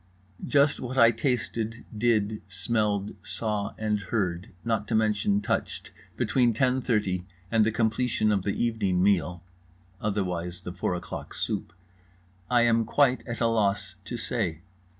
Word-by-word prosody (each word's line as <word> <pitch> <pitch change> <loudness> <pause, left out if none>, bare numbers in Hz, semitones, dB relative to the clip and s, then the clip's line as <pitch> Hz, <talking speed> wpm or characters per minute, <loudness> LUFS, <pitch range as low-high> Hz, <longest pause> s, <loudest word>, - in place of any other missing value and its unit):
Just 145 0 +3
what 130 +1 -5
I 115 -2 +7
tasted, 115 -2 -2
did, 105 -2 +1
smelled, 105 +1 -1
saw, 105 -2 -3
and 105 -1 0
heard, 95 -4 -2 0.2
not 110 -3 0
to 115 - 0
mention 105 -2 +2
touched, 105 - -2 0.3
between 120 -3 +2
ten 130 +3 +2
thirty 95 -7 0 0.2
and 115 -1 +4
the 110 - +2
completion 110 0 +1
of 100 -2 +2
the 100 +1 -1
evening 100 -6 +1
meal 90 -3 +2 0.6
(otherwise 90 -4 -2
the 90 - -6
four 90 0 -1
o'clock 90 - -7
soup) - - -2 0.8
I 120 -1 +4
am 115 -1 +4
quite 130 -1 +2
at 120 0 -4
a - - +4
loss 105 -4 +1
to 120 - -4
say. 100 -8 -2
110 Hz, 145 wpm, -27 LUFS, 100-115 Hz, 0.8 s, I